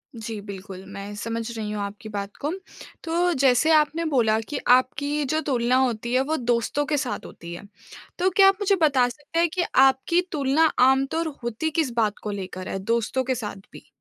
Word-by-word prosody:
जी, 220 -1 -6
बिल्कुल 195 -1 -9
मैं 200 +1 -7
समझ 230 +2 -3 0.2
रही 210 -1 -4
हूँ 210 -1 -3
आपकी 205 +2 -7
बात 200 -1 -5
को। 295 - -1 0.5
तो 345 +1 +1
जैसे 270 +4 +4
आपने 310 +2 +2
बोला 230 -7 +2
कि 295 - -2 0.2
आपकी 260 +2 -1
ये 295 - 0
जो 315 - +1
तुलना 245 -1 +2
होती 240 -2 0
है 255 - +4
वो 315 - +1
दोस्तों 240 +4 0
के 295 0 0
साथ 265 -3 -3
होती 170 0 -10
है, 175 - -8 0.6
तो 370 +2 +3
क्या 390 +1 +6
आप 390 0 +4
मुझे 400 0 +3
बता 270 -5 +4
सकते 295 +5 -5
हैं 340 -1 +3
कि 365 - +1 0.2
आपकी 270 +7 +2
तुलना 295 +1 +2 0.2
आमतौर 275 +5 +1 0.2
होती 240 +7 -2
किस 310 -5 0
बात 215 -3 +1
को 210 - -3
लेकर 185 -2 -6
है 195 - -3
दोस्तों 230 +5 0
के 260 0 -1
साथ 215 -4 -5 0.2
भी? - - -14
255 Hz, 200 wpm, -24 LUFS, 215-305 Hz, 0.6 s, क्या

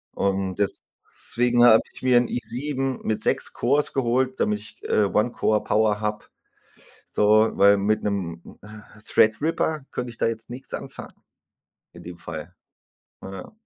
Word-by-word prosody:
Und 95 -1 -1
deswegen 120 +4 +1
habe 110 -2 +7
ich - - -14
mir 125 -1 +5
'n 120 0 +3
i7 135 +2 -3
mit 110 - -1
6 - - 0
Cores 140 +5 +1
geholt, 130 0 0
damit 105 0 +1
ich, 105 - -14
äh, 105 - +2
One-Core-Power 105 0 +1
habe, 105 0 -3 0.8
so, 110 +1 +3
weil 100 0 +6
mit 105 +2 0
'nem, 90 -5 -4
äh, 105 0 -14
Threadripper 145 +7 +1
könnte 125 -1 -4
ich 115 - -15
da - - +1
jetzt 115 0 -4
nix 125 +2 -9
anfangen - - -7 0.8
in - - -13
dem 90 0 -9
Fall. 85 +1 -8 0.7
Na 95 - -9
ja. 95 -1 -9
110 Hz, 145 wpm, -24 LUFS, 100-125 Hz, 0.8 s, habe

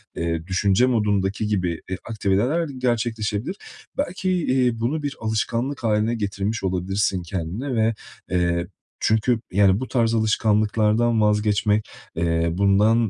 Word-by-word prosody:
eee, 85 0 -2
düşünce 95 +4 +3
modundaki 105 -4 0
gibi 90 -5 -1
bir 95 0 -3
aktiviteler 115 - +1
gerçekleşebilir. 120 - -1 0.4
Belki, 190 -9 -1
iii, 130 -9 +1
bunu 145 +7 -1
bir 145 -1 -3
alışkanlık 115 +4 -2
haline 110 +1 +1
getirmiş 100 0 -2
olabilirsin 95 +1 0
kendine 95 - -4
ve, 110 0 +2 0.4
eee, 85 -1 +1 0.3
çünkü, 110 +2 +2
yani, 95 0 +4
bu 130 - -4
tarz 115 -3 +1
alışkanlıklardan 110 +1 +2
vazgeçmek, 105 0 +2 0.3
eee, 85 0 +1
bundan 105 +4 +3
105 Hz, 120 wpm, -23 LUFS, 95-120 Hz, 0.4 s, yani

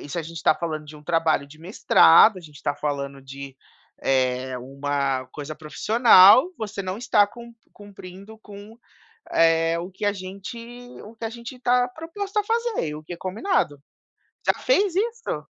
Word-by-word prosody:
isso 145 +4 -6
a - - -2
gente 165 0 -9
tá - - +4
falando 155 -2 -5
de 150 +1 -11
um 150 - -15
trabalho 165 -4 +1
de 155 +2 -16
mestrado, 185 +2 +5
a - - -11
gente 150 -3 -15
está 145 - -3
falando 140 -2 -4
de, 135 0 -10 0.5
eh, 130 -1 0
uma 135 0 -3
coisa 150 +1 -7
profissional, 215 - +5
você 215 -2 -5
não 185 +1 -4
está 215 -4 +3
cump 235 +3 -13 0.2
cumprindo 200 +1 -13
com, 210 +2 -13 0.5
eh, 165 0 +3
o 180 +3 -7
que 190 - -5
a 205 - +2
gente 195 +5 -8 0.5
o 220 +2 -13
que 225 - -7
a - - -3
gente 235 +2 -10
tá 245 0 +2
proposto 385 +9 -7
a 415 - -1
fazer, 460 - -1
e 150 - -6
o 155 - -10
que 170 +3 -8
combinado." 185 - -2 0.7
Já - - +5
fez 405 -7 +2
isso? 460 +3 -2
185 Hz, 175 wpm, -23 LUFS, 150-235 Hz, 0.7 s, mestrado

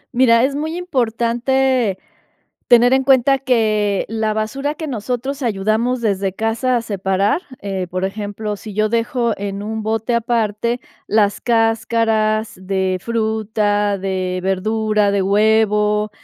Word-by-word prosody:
Mira, 235 -2 +5
es 275 +1 +1
muy 315 +3 -3
importante 245 - 0 0.7
tener 245 +1 +6
en 265 0 +3
cuenta 270 0 +4
que 215 -6 +1
la 220 -1 -1
basura 270 +7 -2
que 315 0 -6
nosotros 255 +3 -3
ayudamos 225 +3 0
desde 195 -3 0
casa 225 +4 0
a 235 - -2
separar, 195 - 0 0.2
eh, 195 -2 -3
por 185 +2 -2
ejemplo, 205 +1 -4
si 210 -1 -9
yo 215 +1 +1
dejo 235 +1 0
en 200 0 -4
un 220 +1 -4
bote 225 +2 -1
aparte 235 0 0 0.3
las 205 -1 +1
cáscaras 225 -1 +1
de 190 -1 -1
fruta, 215 -2 0
de 185 -1 -2
verdura, 210 +2 +1
de 200 -1 +1
huevo, 210 +1 +2
220 Hz, 130 wpm, -19 LUFS, 205-240 Hz, 0.7 s, tener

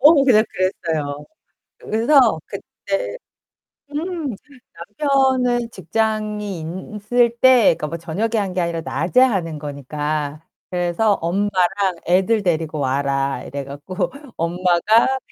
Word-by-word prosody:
어, 290 0 +7
그냥 220 -4 +5
그랬어요. 160 -6 -2 0.5
그래서 230 - +3
그때 200 - -5 0.7
음 310 - -3 0.6
남편은 260 -4 +2
직장이 210 -5 -2 0.3
있을 235 +3 +1
때 250 -8 +6
그니까 155 -3 -3
뭐 165 +2 -5
저녁에 200 +8 -2
한 195 -3 -1
게 185 - 0
아니라 170 -1 -2
낮에 155 - 0
하는 180 -11 +1
거니까. 150 +1 -4 0.3
그래서 180 +4 +1
엄마랑 190 +1 0
애들 190 +5 +2
데리고 160 -3 -1
와라 135 -1 0
이래 140 +1 -5
갖고 160 - -4 0.3
엄마가 180 +9 +2
185 Hz, 240 characters per minute, -20 LUFS, 160-230 Hz, 0.7 s, 어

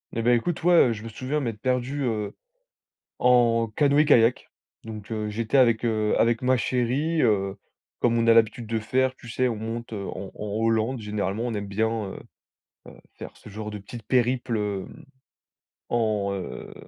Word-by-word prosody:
Et 115 - -1
bah 120 +1 +4
écoute, 155 +8 -1
ouais, 175 0 +4 0.2
heu, - - 0
je 105 0 -8
me 115 - -6
souviens 130 +5 -3
m'être 115 -6 -4
perdu, 130 +2 -1
heu, 110 -4 -2 0.9
en 120 -2 +4
canoë-kayak. 145 -5 +4 0.4
Donc, 110 -1 -8
heu, 110 -1 -2
j'étais 110 +4 -1
avec, 120 -3 +4
heu, 110 -2 +1
avec 115 +1 +2
ma 130 +1 +3
chérie. 130 +7 0
Heu, 100 -4 +1 0.4
comme 115 -1 +2
on 115 - +1
a 115 - +7
l'habitude 115 +1 +2
de 115 0 0
faire, 130 +4 0
tu 120 - -13
sais, 130 +1 0
on 115 - -2
monte, 115 +2 -5
heu, 100 -2 -4
en 95 +1 -6
en 105 - -5 0.2
Hollande. 115 +3 +1
Généralement, 105 0 -2
on 120 - -3
aime 100 -1 -3
bien, 110 +3 0 0.2
heu, - - -8 0.8
heu, - - -16 0.2
faire - - -10
ce - - -14
genre 105 +1 -6
de 105 - -6
petites 115 +4 -10
périples, 120 0 +1
hem, 105 +8 -5 0.8
en, 110 -4 0
heu, 95 -2 -7
115 Hz, 180 wpm, -25 LUFS, 105-125 Hz, 0.9 s, a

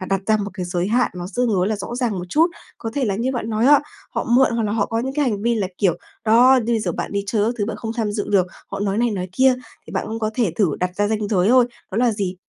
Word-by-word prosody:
và 185 - -5
đặt 195 0 0
ra 220 -1 +4
một 205 -1 -3
cái 185 -2 -4
giới 175 +1 -1
hạn 245 +3 +2
nó 175 -1 -5
tương 250 -1 +2
đối 190 -3 +1
là 215 - -1
rõ 200 +4 -6
ràng 240 -6 -1
một 180 - -4
chút. 315 - +4 0.3
Có 225 - -4
thể 280 - 0
là 205 -4 0
như 245 +5 -1
bạn 230 -3 -3
nói 220 +2 +1
á, 290 +1 +7 0.3
họ - - -2
mượn 250 +3 +4
hoặc 230 - 0
là 210 -1 -1
họ 220 -2 +1
có 225 - -2
những 265 +3 -3
cái 295 -1 +1
hành 210 -5 -1
vi 235 +1 +2
là 210 -4 0
kiểu, 185 -5 +2 0.3
đó, 245 +4 +6
như 235 - 0
bây 225 - +1
giờ - - -2
bạn - - -4
đi 200 0 -1
chơi 205 +1 +1
các 230 +3 0
thứ 205 - +1
bạn 220 -1 -4
không 225 +1 -4
tham 215 -3 -1
dự 205 -1 -3
được, 190 -3 +3 0.2
họ 195 - -5
nói 200 +1 0
này 240 -1 +2
nói 185 -3 -3
kia, 260 +5 +4 0.3
thì - - -10
bạn - - -2
cũng 225 +1 -4
có 215 -1 -1
thể 225 -9 +1
thử 195 -7 +3
đặt 180 0 0
ra 205 0 +1
ranh 215 -1 -1
giới 195 -1 +2
thôi, 250 0 +5 0.2
đó 190 - -5
là 245 -1 +3
gì? 190 -3 -3
215 Hz, 320 wpm, -21 LUFS, 200-240 Hz, 0.3 s, á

